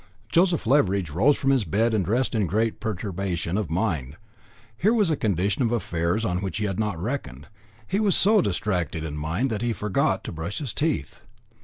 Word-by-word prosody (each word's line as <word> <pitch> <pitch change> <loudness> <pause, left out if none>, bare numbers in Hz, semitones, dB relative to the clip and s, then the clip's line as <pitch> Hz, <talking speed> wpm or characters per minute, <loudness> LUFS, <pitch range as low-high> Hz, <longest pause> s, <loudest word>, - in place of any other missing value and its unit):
Joseph 170 - +2
Leveridge 100 - +2
rose 115 - +3
from 135 - +1
his 135 -4 +3
bed 110 +7 +1
and 105 -3 +2
dressed 120 +7 0
in 105 -5 +1
great 110 +6 0
perturbation 95 -4 -3
of 105 -6 -1
mind. 80 - -1 0.6
Here 210 - +2
was 205 -7 +3
a - - +2
condition 100 - 0
of 115 -2 +2
affairs 85 -2 0
on 90 -4 0
which 95 -3 -3
he 105 - -1
had 95 -1 -2
not 105 -6 -1
reckoned. 80 - -4 0.4
He 195 - 0
was 205 -3 +3
so 210 +1 +5
distracted 90 -4 -1
in 75 -2 -5
mind 85 - -1
that 110 -1 -2
he 120 -1 0
forgot 105 -3 0
to - - -5
brush 80 +5 -5
his 140 -7 -4
teeth. 150 - -2
105 Hz, 195 wpm, -25 LUFS, 85-125 Hz, 0.6 s, so